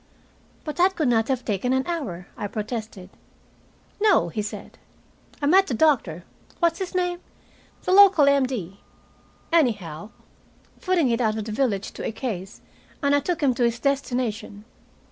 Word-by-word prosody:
"But 300 Hz, 0 st, -6 dB
that 370 Hz, +2 st, +3 dB
could 310 Hz, -6 st, +1 dB
not 225 Hz, -1 st, +2 dB
have 260 Hz, -2 st, -2 dB
taken 220 Hz, +4 st, 0 dB
an 260 Hz, 0 st, +1 dB
hour," 255 Hz, -, -4 dB
I 205 Hz, -, -4 dB
protested. 215 Hz, -3 st, -6 dB, 0.9 s
"No," 410 Hz, -, +4 dB
he 210 Hz, -, -3 dB
said. 210 Hz, -, -8 dB, 0.6 s
"I -, -, +3 dB
met 380 Hz, +6 st, +5 dB
the 245 Hz, -, -2 dB
doctor 220 Hz, -, +1 dB, 0.4 s
what's 340 Hz, +1 st, +1 dB
his 375 Hz, -1 st, -5 dB
name? 355 Hz, -1 st, 0 dB, 0.6 s
the -, -, -1 dB
local 385 Hz, -6 st, +7 dB
M.D. 255 Hz, -9 st, 0 dB, 0.7 s
anyhow 210 Hz, -, 0 dB, 0.7 s
footing 355 Hz, -8 st, +1 dB
it 230 Hz, +1 st, 0 dB
out 220 Hz, -2 st, +1 dB
of 215 Hz, -, -4 dB
the 220 Hz, -, -5 dB
village 215 Hz, -4 st, -1 dB
to -, -, -8 dB
a -, -, -2 dB
case, 210 Hz, -5 st, -6 dB, 0.4 s
and 280 Hz, 0 st, +3 dB
I 285 Hz, -, +4 dB
took 340 Hz, +4 st, -3 dB
him 265 Hz, -3 st, +3 dB
to 245 Hz, -, -1 dB
his 235 Hz, 0 st, +1 dB
destination. 245 Hz, -6 st, -2 dB
250 Hz, 160 wpm, -24 LUFS, 210-315 Hz, 0.9 s, local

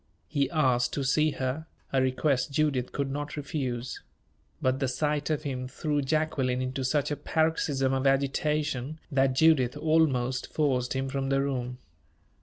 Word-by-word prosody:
He 140 Hz, -1 st, 0 dB
asked 125 Hz, -6 st, +2 dB
to 140 Hz, -, -1 dB
see 155 Hz, +3 st, +3 dB
her 135 Hz, +5 st, -3 dB, 0.3 s
a 135 Hz, -, +3 dB
request 130 Hz, +1 st, +1 dB
Judith 140 Hz, -4 st, +1 dB
could 140 Hz, -1 st, -2 dB
not 145 Hz, +2 st, -4 dB
refuse. 130 Hz, -5 st, -3 dB, 0.6 s
But 130 Hz, +1 st, +1 dB
the 135 Hz, -, +1 dB
sight 150 Hz, +3 st, -1 dB
of 155 Hz, -1 st, 0 dB
him 130 Hz, -3 st, -3 dB
threw 145 Hz, +3 st, -1 dB
Jacqueline 135 Hz, -3 st, 0 dB
into 130 Hz, +1 st, -2 dB
such 140 Hz, +3 st, +1 dB
a -, -, +1 dB
paroxysm 145 Hz, -4 st, +1 dB
of 135 Hz, +1 st, +1 dB
agitation, 140 Hz, +1 st, 0 dB
that 135 Hz, -1 st, +3 dB
Judith 135 Hz, -5 st, +4 dB
almost 130 Hz, -6 st, +1 dB
forced 130 Hz, -5 st, +1 dB
him 135 Hz, 0 st, -1 dB
from 135 Hz, 0 st, -2 dB
the 135 Hz, 0 st, +2 dB
room. 125 Hz, -3 st, -3 dB
135 Hz, 155 wpm, -28 LUFS, 130-150 Hz, 0.6 s, Judith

